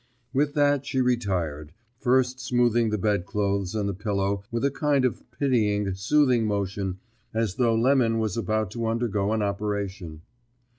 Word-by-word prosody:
With 145 +2 +1
that 145 -2 +3
she 135 -1 -2
retired, 90 - -1 0.3
first 130 0 +2
smoothing 120 -2 +2
the 105 - 0
bedclothes 100 0 -1
and 105 -2 0
the 100 - -1
pillow 100 0 -1
with 115 +2 -1
a 140 - +2
kind 145 -2 +1
of 125 - -1
pitying, 110 -6 +1
soothing 120 +4 +2
motion 100 -2 -2 0.4
as 110 -4 0
though 120 -3 +3
Lemon 120 -1 +3
was 110 -4 -1
about 110 -2 -1
to 115 0 -3
undergo 110 -3 0
an 110 -1 +1
operation. 100 -5 -3
110 Hz, 150 wpm, -26 LUFS, 100-125 Hz, 0.4 s, that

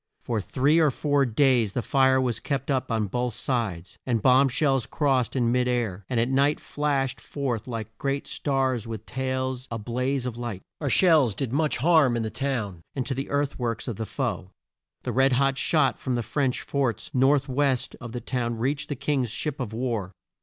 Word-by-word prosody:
For 115 -3 -1
three 140 - +2
or 155 -2 +5
four 145 0 +1
days 120 -3 +3
the 125 - -1
fire 130 -1 +3
was 125 -3 0
kept 140 -1 -2
up 130 -3 -1
on 110 -2 +1
both 120 +3 -2
sides, 100 -9 -3
and 120 -3 0
bomb 130 +4 +5
shells 135 -2 +1
crossed 135 -5 +1
in 120 -3 +2
mid 125 0 +2
air, 110 -6 -1
and 125 - +1
at 115 - +2
night 140 +3 +2
flashed 140 -3 -1
forth 130 -6 -3
like 110 -2 -5
great 140 0 -1
stars 130 -5 -1
with 110 -1 -6
tails 130 0 -3
a 115 - -3
blaze 125 +4 -2
of 120 -2 -4
light. 115 -6 -5 0.2
Our 145 - -1
shells 150 - +5
did 125 +3 -3
much 150 +1 +1
harm 145 -3 +4
in 115 - -1
the 110 - -3
town, 115 -11 -3
and 130 -3 -2
to 135 - -1
the 135 +2 -4
earth 145 -1 -1
works 115 -1 -2
of 115 -5 -4
the 110 - -4
foe. 115 -9 -3 0.5
The 125 - -2
red 135 +3 +3
hot 135 +1 +2
shot 140 -6 +2
from 130 - -2
the 120 - -1
French 135 0 -1
forts 130 -7 -2
north 135 +2 +3
west 135 -1 0
of 120 -2 -7
the 120 0 -5
town 120 -1 -2
reached 140 +5 -1
the 145 - -2
King's 135 -2 0
ships 145 +5 -3
of 125 -5 -3
war. 110 -5 -3
130 Hz, 205 wpm, -26 LUFS, 115-140 Hz, 0.5 s, or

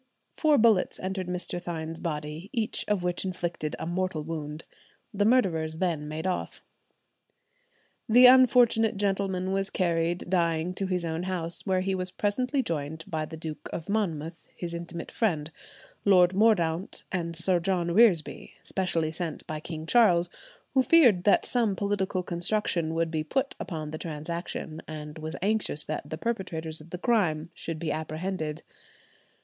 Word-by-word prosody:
Four 305 -2 +4
bullets 220 -5 +3
entered 185 -1 -3
Mr. 180 0 -3
Thynne's 165 -2 -5
body, 155 +2 -4
each 225 -5 0
of 205 -4 0
which 180 0 -1
inflicted 175 -4 -3
a - - -5
mortal 175 -2 -2
wound. 155 -1 -5 0.5
The 205 0 +1
murderers 165 -10 +2
then 160 -4 -1
made 155 +3 -5
off. 185 -1 -3 1.5
The 245 +3 +8
unfortunate 245 -4 +6
gentleman 195 -2 0
was 195 0 0
carried 170 -2 0
dying 170 -1 +1
to 195 +1 -3
his 180 -2 -1
own 165 0 -2
house, 180 0 -2
where 185 -1 +2
he 190 +1 -1
was 185 -1 -2
presently 250 +8 0
joined 160 -2 -4
by 155 -1 -2
the 160 +1 -9
Duke 155 -1 -6
of 165 - -6
Monmouth, 170 -6 -2
his 170 -1 -4
intimate 170 0 -6
friend, 160 -9 0 0.5
Lord 180 -2 +5
Mordaunt, 190 -4 +2
and 170 -3 -2
Sir 175 +2 +3
John 175 -1 0
Reresby, 185 -5 +3
specially 170 -4 -1
sent 165 -1 -4
by 155 -1 -4
King 155 0 -6
Charles, 175 -5 +4 0.4
who 265 - +5
feared 250 - +6
that 205 - +4
some 230 -5 +1
political 195 -1 -1
construction 175 -2 0
would 165 0 0
be 155 -1 -1
put 270 - -1
upon 155 -4 -5
the 155 - -5
transaction 160 0 -5
and 150 0 -7
was 155 +1 -5
anxious 205 -7 0
that 150 -1 -4
the 155 - -4
perpetrators 165 -7 -3
of 155 - -14
the 180 - -5
crime 175 -7 +1
should 165 -2 -5
be 155 -1 -2
apprehended. 155 0 -3
175 Hz, 155 wpm, -28 LUFS, 160-195 Hz, 1.5 s, The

